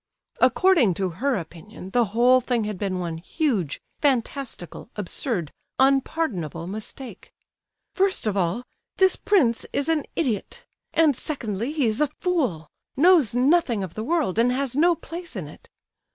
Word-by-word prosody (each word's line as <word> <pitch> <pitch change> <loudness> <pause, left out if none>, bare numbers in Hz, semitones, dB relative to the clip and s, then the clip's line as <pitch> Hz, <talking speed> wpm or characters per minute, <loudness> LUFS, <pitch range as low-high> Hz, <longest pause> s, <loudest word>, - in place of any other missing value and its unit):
According 330 - +4
to 190 +1 -1
her 250 +11 -1
opinion, 180 +2 -8
the 240 +1 +3
whole 240 +5 +4
thing 240 -2 0
had 210 -3 -4
been 190 -2 -2
one 170 -2 -4
huge, 200 - -1 0.2
fantastical, 265 - -2
absurd, 200 - -2 0.3
unpardonable 265 - +1
mistake. 215 +7 -7 0.6
"First 385 -6 +1
of 210 -2 0
all, 185 +5 0 0.3
this 380 -1 +4
prince 260 - +2
is 285 +3 -1
an 315 -3 +1
idiot, 305 - -2 0.3
and, 315 -4 +4
secondly, 235 -4 -3
he 300 -4 0
is 220 +4 0
a 300 - +4
fool—knows 285 - +1
nothing 255 - +3
of 180 -3 -6
the 215 - -4
world, 290 - 0
and 240 +2 +4
has 260 -1 -1
no 340 +4 +4
place 335 -3 -9
in 180 -7 -5
it. 150 - -15
245 Hz, 145 wpm, -24 LUFS, 195-300 Hz, 0.6 s, According